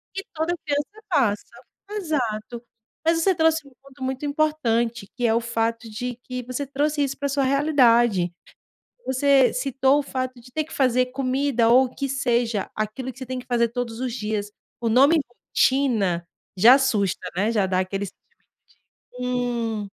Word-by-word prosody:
Que 390 Hz, -, -3 dB
toda 320 Hz, +3 st, -1 dB
criança 295 Hz, +9 st, -3 dB
passa. 245 Hz, -, +1 dB, 0.4 s
Exato. 245 Hz, -, -3 dB, 0.4 s
Mas 330 Hz, 0 st, +3 dB
você 380 Hz, +1 st, +3 dB
trouxe 320 Hz, -2 st, +2 dB
um 275 Hz, -, -16 dB
ponto 275 Hz, 0 st, -15 dB
muito 265 Hz, +2 st, -3 dB
importante, 240 Hz, -8 st, 0 dB
que 245 Hz, -1 st, +1 dB
é 225 Hz, -, +2 dB
o 230 Hz, -, +2 dB
fato 230 Hz, 0 st, -2 dB
de 245 Hz, +3 st, -4 dB
que 250 Hz, 0 st, -5 dB
você 255 Hz, +3 st, -3 dB
trouxe 290 Hz, +2 st, 0 dB
isso 275 Hz, -1 st, -1 dB
pra 285 Hz, -, -2 dB
a -, -, 0 dB
sua 275 Hz, 0 st, 0 dB
realidade. 240 Hz, -, +3 dB, 0.7 s
Você 265 Hz, 0 st, +4 dB
citou 270 Hz, +1 st, +2 dB
o -, -, 0 dB
fato 255 Hz, -2 st, -4 dB
de 240 Hz, -, -16 dB
ter 310 Hz, +3 st, -1 dB
que 320 Hz, -, -15 dB
fazer 255 Hz, -4 st, +2 dB
comida 255 Hz, -2 st, 0 dB
ou 255 Hz, +3 st, +6 dB
o 250 Hz, -, -7 dB
que 275 Hz, -, -3 dB
seja, 240 Hz, -6 st, 0 dB
aquilo 215 Hz, +5 st, -4 dB
que 265 Hz, -, -18 dB
você 260 Hz, -, -7 dB
tem 255 Hz, 0 st, -4 dB
que 250 Hz, -, -9 dB
fazer 235 Hz, -1 st, +2 dB
todos 235 Hz, -1 st, -4 dB
os 255 Hz, -2 st, -2 dB
dias. 210 Hz, -3 st, -3 dB, 0.3 s
O 235 Hz, -, 0 dB
nome 275 Hz, +8 st, +5 dB, 0.4 s
"rotina" 215 Hz, -11 st, +2 dB, 0.3 s
já, 230 Hz, +7 st, +8 dB
assusta, 205 Hz, -9 st, +1 dB
né, 205 Hz, +5 st, +1 dB
já 205 Hz, -4 st, +2 dB
dá 185 Hz, -1 st, +1 dB
aquele 195 Hz, +2 st, -2 dB
sentimento -, -, -13 dB, 1.0 s
de, 250 Hz, -, -2 dB
hum. 235 Hz, -4 st, -1 dB
250 Hz, 180 wpm, -23 LUFS, 230-280 Hz, 1.0 s, já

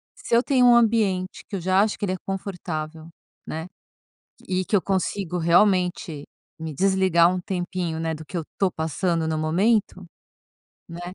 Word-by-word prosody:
se -, -, -6 dB
eu 235 Hz, -, +6 dB
tenho 255 Hz, -1 st, +3 dB
um 240 Hz, -1 st, +7 dB
ambiente 210 Hz, -5 st, +1 dB
que 200 Hz, -, -4 dB
eu -, -, -4 dB
já 185 Hz, +2 st, +3 dB
acho 215 Hz, 0 st, 0 dB
que -, -, -1 dB
ele 185 Hz, -, -1 dB
é -, -, -3 dB
confortável, 165 Hz, -5 st, -5 dB, 0.4 s
né, 160 Hz, +2 st, -5 dB, 0.8 s
e 185 Hz, 0 st, 0 dB
que 210 Hz, -, -4 dB
eu 200 Hz, -, +5 dB
consigo, 190 Hz, -1 st, -1 dB
realmente, 175 Hz, -3 st, +2 dB, 0.3 s
me 160 Hz, -1 st, -5 dB
desligar 185 Hz, -1 st, +3 dB
um 185 Hz, -, -2 dB
tempinho, 175 Hz, -2 st, -3 dB
né, 165 Hz, 0 st, -1 dB
do 155 Hz, 0 st, -9 dB
que 180 Hz, -, -8 dB
eu 170 Hz, -, -1 dB
estou 195 Hz, -2 st, 0 dB
passando 165 Hz, +1 st, -1 dB
no 160 Hz, -, -1 dB
momento, 185 Hz, +4 st, +1 dB, 0.8 s
né, 170 Hz, +1 st, -9 dB
185 Hz, 170 wpm, -24 LUFS, 165-195 Hz, 0.8 s, um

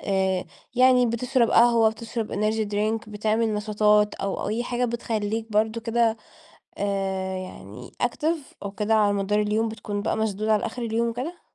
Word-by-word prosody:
آآ 190 Hz, -2 st, 0 dB, 0.3 s
يعني 250 Hz, 0 st, +5 dB
بتشرب 235 Hz, +1 st, +1 dB
قهوة، 230 Hz, -2 st, +5 dB
بتشرب 225 Hz, 0 st, -5 dB
energy 215 Hz, +1 st, 0 dB
drink 215 Hz, +2 st, -1 dB
بتعمل 215 Hz, +1 st, 0 dB
نشاطات 210 Hz, 0 st, +2 dB
أو 195 Hz, 0 st, -3 dB
أي 225 Hz, +3 st, -1 dB
حاجة 245 Hz, 0 st, -1 dB
بتخلّيك 225 Hz, -2 st, -2 dB
برضه 220 Hz, +2 st, +1 dB
كده 230 Hz, -1 st, +1 dB, 0.6 s
آآ 190 Hz, -2 st, -2 dB
يعني 125 Hz, -, -9 dB
active 310 Hz, +7 st, 0 dB, 0.3 s
أو 200 Hz, -, -4 dB
كده 210 Hz, +2 st, -1 dB
على 205 Hz, -1 st, +3 dB
مدار 200 Hz, +1 st, 0 dB
اليوم 215 Hz, +2 st, +1 dB
بتكون 205 Hz, -2 st, -4 dB
بقى -, -, -1 dB
مشدود 215 Hz, -1 st, -1 dB
على 215 Hz, 0 st, +2 dB
آخر 240 Hz, +2 st, -5 dB
اليوم 230 Hz, 0 st, 0 dB
وكده؟ 275 Hz, +10 st, -5 dB
220 Hz, 155 wpm, -25 LUFS, 205-230 Hz, 0.6 s, يعني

